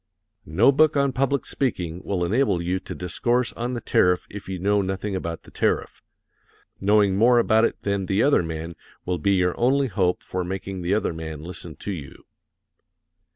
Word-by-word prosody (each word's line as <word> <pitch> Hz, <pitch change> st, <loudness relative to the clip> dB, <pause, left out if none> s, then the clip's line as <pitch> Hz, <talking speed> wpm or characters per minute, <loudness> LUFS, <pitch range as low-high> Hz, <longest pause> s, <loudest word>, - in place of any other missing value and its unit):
No 80 Hz, -, +4 dB
book 155 Hz, +1 st, +3 dB
on 140 Hz, -1 st, +2 dB
public 135 Hz, +2 st, 0 dB
speaking 90 Hz, -10 st, -2 dB
will 90 Hz, -3 st, -1 dB
enable 110 Hz, 0 st, +1 dB
you 90 Hz, +2 st, -1 dB
to -, -, -8 dB
discourse 120 Hz, +8 st, 0 dB
on 120 Hz, +2 st, -3 dB
the 120 Hz, -, -4 dB
tariff 90 Hz, -3 st, +2 dB
if 100 Hz, -2 st, -8 dB
you 95 Hz, -, -3 dB
know 100 Hz, +3 st, +2 dB
nothing 95 Hz, +1 st, -3 dB
about 85 Hz, -3 st, -4 dB
the -, -, -16 dB
tariff. -, -, -1 dB, 0.8 s
Knowing 100 Hz, -1 st, +3 dB
more 120 Hz, +4 st, +5 dB
about 110 Hz, -1 st, +4 dB
it -, -, -3 dB
than 100 Hz, -2 st, -1 dB
the 100 Hz, +3 st, +2 dB
other 140 Hz, -6 st, +4 dB
man 80 Hz, 0 st, -5 dB, 0.3 s
will 90 Hz, -1 st, -1 dB
be 100 Hz, +6 st, +2 dB
your 90 Hz, -2 st, +2 dB
only 135 Hz, +2 st, +2 dB
hope 90 Hz, -4 st, 0 dB
for 90 Hz, 0 st, -3 dB
making 95 Hz, +1 st, -5 dB
the 90 Hz, +3 st, +1 dB
other 105 Hz, -5 st, 0 dB
man 80 Hz, -2 st, -7 dB
listen 85 Hz, -2 st, -6 dB
to 105 Hz, -, -6 dB
you. 75 Hz, -8 st, -8 dB
95 Hz, 185 wpm, -24 LUFS, 90-115 Hz, 0.8 s, more